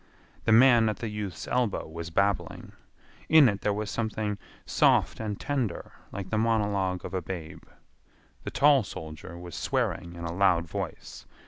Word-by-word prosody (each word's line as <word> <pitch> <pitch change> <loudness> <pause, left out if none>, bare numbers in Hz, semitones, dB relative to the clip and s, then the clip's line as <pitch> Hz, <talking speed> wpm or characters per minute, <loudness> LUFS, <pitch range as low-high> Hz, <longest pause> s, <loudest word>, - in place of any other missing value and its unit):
The - - +3
man 115 -1 +6
at 105 - -3
the 115 - -4
youth's 105 -5 -5
elbow 125 -4 0
was 85 +1 -7
babbling. 100 +2 -1 0.6
In 155 -4 +8
it 100 -3 -1
there 105 - +1
was 105 +1 -3
something 110 -2 -2 0.3
soft - - +3
and 105 -2 -4
tender 130 -10 -2 0.2
like 95 -2 -6
the 110 - +1
monologue 105 -5 0
of - - -7
a 95 - -1
babe. 85 -2 -7 0.8
The - - -5
tall 145 -1 +5
soldier 80 -3 -8
was 85 -1 -9
swearing 85 0 -2
in 85 - -8
a 85 - -3
loud 90 -3 +3
voice. - - -6
100 Hz, 160 wpm, -28 LUFS, 90-110 Hz, 0.8 s, In